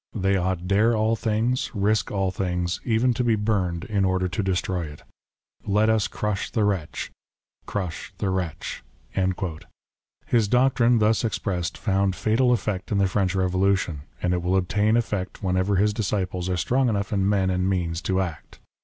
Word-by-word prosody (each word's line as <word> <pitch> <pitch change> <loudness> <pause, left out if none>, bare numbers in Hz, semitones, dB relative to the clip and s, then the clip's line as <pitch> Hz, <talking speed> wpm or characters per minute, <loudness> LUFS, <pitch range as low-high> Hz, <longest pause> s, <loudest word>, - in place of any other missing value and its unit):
They 95 -1 +1
ought 90 -1 -1
dare 110 +4 +3
all 110 +1 +2
things, 115 +3 0
risk 105 +2 +1
all 95 -2 0
things, 90 -2 -2
even 120 +1 +2
to 125 +1 -1
be 115 -2 +3
burned, 95 -5 0
in 100 -2 0
order 95 -1 +1
to 100 +4 -2
destroy 90 -2 -1
it. 75 0 -12 0.6
Let 105 +2 +2
us 110 -2 +2
crush 105 -2 -2
the 110 - 0
wretch! 95 -7 -2 0.6
Crush 90 -5 -4
the 95 - -1
wretch 90 -9 -4 0.7
!" 80 -1 -18
His 115 -3 +2
doctrine 125 0 +3
thus 110 +1 +2
expressed 95 -5 -2
found 100 -3 +1
fatal 120 +6 +2
effect 105 -6 -1
in 105 - +2
the 100 -1 +3
French 95 -1 0
Revolution, 95 -4 +1 0.2
and 90 - +2
it 90 - 0
will 90 +2 +1
obtain 105 +4 +2
effect 105 -5 -3
when 90 -1 +1
ever 95 +2 +1
his 105 +2 +3
disciples 95 -4 -2
are 90 - 0
strong 125 +7 +2
enough 100 -1 -1
in 100 -1 +2
men 95 -2 +2
and 90 +1 0
means 85 -3 -1
to 95 +1 0
act. 85 -5 -6
100 Hz, 175 wpm, -24 LUFS, 90-110 Hz, 0.7 s, dare